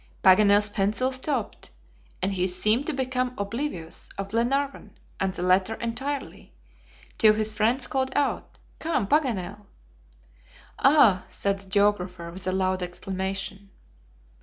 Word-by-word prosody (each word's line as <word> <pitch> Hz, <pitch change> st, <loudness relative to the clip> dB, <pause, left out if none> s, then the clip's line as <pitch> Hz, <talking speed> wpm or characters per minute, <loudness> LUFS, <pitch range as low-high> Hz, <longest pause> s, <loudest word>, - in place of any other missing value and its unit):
Paganel's 205 Hz, +2 st, +6 dB
pencil 210 Hz, +5 st, 0 dB
stopped, 260 Hz, +3 st, -2 dB, 0.5 s
and 195 Hz, +1 st, +1 dB
he 185 Hz, -1 st, 0 dB
seemed 215 Hz, +8 st, +1 dB
to 315 Hz, -, -1 dB
become 255 Hz, -1 st, -2 dB
oblivious 200 Hz, -, -4 dB
of 195 Hz, 0 st, -4 dB
Glenarvan 270 Hz, +6 st, -1 dB, 0.2 s
and 190 Hz, 0 st, 0 dB
the 180 Hz, -1 st, -5 dB
letter 185 Hz, +4 st, +2 dB
entirely, 265 Hz, +5 st, -5 dB, 0.7 s
till 215 Hz, -2 st, +6 dB
his 215 Hz, 0 st, 0 dB
friends 235 Hz, +4 st, +1 dB
called 265 Hz, -2 st, -1 dB
out: 290 Hz, -1 st, -1 dB, 0.2 s
"Come, 315 Hz, -9 st, 0 dB
Paganel!" 210 Hz, -, -1 dB, 1.1 s
"Ah!" 240 Hz, -10 st, +5 dB
said 200 Hz, -1 st, -1 dB
the 195 Hz, -1 st, -10 dB
geographer, 185 Hz, -4 st, 0 dB
with 185 Hz, +2 st, -5 dB
a -, -, +2 dB
loud 185 Hz, 0 st, 0 dB
exclamation. 190 Hz, +2 st, -4 dB
205 Hz, 125 wpm, -26 LUFS, 190-255 Hz, 1.1 s, Paganel's